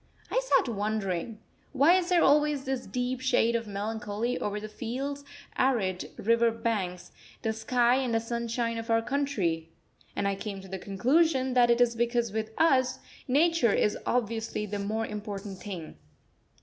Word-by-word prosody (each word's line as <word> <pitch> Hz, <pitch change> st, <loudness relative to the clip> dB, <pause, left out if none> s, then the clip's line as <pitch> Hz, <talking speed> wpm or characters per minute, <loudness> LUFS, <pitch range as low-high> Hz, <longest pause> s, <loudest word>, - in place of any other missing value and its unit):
I -, -, +3 dB
sat -, -, +2 dB
wondering: 210 Hz, -2 st, -2 dB, 0.4 s
Why 285 Hz, +5 st, +5 dB
is 365 Hz, -1 st, +2 dB
there 355 Hz, -2 st, +4 dB
always 295 Hz, -1 st, +3 dB
this 265 Hz, -2 st, -3 dB
deep 250 Hz, +1 st, -2 dB
shade 245 Hz, -3 st, +2 dB
of 230 Hz, -1 st, -2 dB
melancholy 220 Hz, +3 st, -3 dB
over 210 Hz, 0 st, -2 dB
the 215 Hz, -, -6 dB
fields 265 Hz, +6 st, -4 dB, 0.4 s
arid 205 Hz, -9 st, +1 dB
river 230 Hz, +2 st, +3 dB
banks, 200 Hz, -6 st, -3 dB, 0.3 s
the 220 Hz, -, 0 dB
sky 240 Hz, +2 st, +2 dB
and 260 Hz, -3 st, -1 dB
the -, -, +3 dB
sunshine 230 Hz, 0 st, -2 dB
of 225 Hz, +1 st, -7 dB
our 225 Hz, 0 st, +3 dB
country? 215 Hz, -, -1 dB, 0.5 s
And 200 Hz, -, 0 dB
I 200 Hz, -, +1 dB
came 195 Hz, 0 st, -5 dB
to 190 Hz, -, -12 dB
the 190 Hz, 0 st, -5 dB
conclusion 260 Hz, -, +2 dB
that 245 Hz, -1 st, +5 dB
it 235 Hz, 0 st, +4 dB
is 240 Hz, -1 st, +4 dB
because 235 Hz, -1 st, 0 dB
with 220 Hz, +1 st, -2 dB
us 260 Hz, -6 st, +3 dB, 0.3 s
Nature 290 Hz, -4 st, +3 dB
is 210 Hz, -, +2 dB
obviously 225 Hz, -2 st, -1 dB
the 205 Hz, 0 st, -4 dB
more 215 Hz, +3 st, -1 dB
important 205 Hz, -2 st, -6 dB
thing. 180 Hz, -6 st, -7 dB
230 Hz, 160 wpm, -28 LUFS, 210-255 Hz, 0.5 s, Why